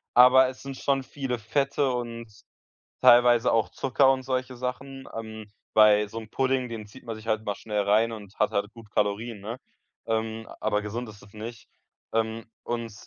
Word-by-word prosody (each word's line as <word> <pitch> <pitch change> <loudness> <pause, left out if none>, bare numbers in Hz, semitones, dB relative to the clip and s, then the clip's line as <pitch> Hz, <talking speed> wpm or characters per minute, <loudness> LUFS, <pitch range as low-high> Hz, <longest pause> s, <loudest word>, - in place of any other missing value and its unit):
aber 130 +1 +8
es 130 - -11
sind 135 -1 -6
schon 135 0 0
viele 130 -2 -4
Fette 135 +4 0
und 115 -2 -5 0.7
teilweise 120 -1 +6
auch 115 -2 +2
Zucker 135 0 +3
und 130 - -2
solche 130 -1 -2
Sachen. 135 +2 -5
Ähm, 110 -1 -8 0.2
bei 105 -1 +6
so 115 +2 -7
'm 110 - -11
Pudding 130 -1 0
den 110 -2 -6
zieht 110 +6 -15
man 115 -2 -5
sich 110 0 -12
halt 110 -1 0
mal 105 - -1
schnell 105 -2 -2
rein 110 +3 +3
und 105 -3 -10
hat 105 - +2
halt 100 +1 -1
gut 115 -3 -14
Kalorien, 105 +2 -1
ne? 110 +5 -6 0.5
Ähm, 110 0 -2
aber 105 -1 0
gesund 115 +3 -5
ist 105 -1 -12
das 100 - -17
nicht. 110 +1 -8 0.4
Ähm, 115 0 -1 0.2
und 115 -2 -4
115 Hz, 185 wpm, -26 LUFS, 110-130 Hz, 0.7 s, aber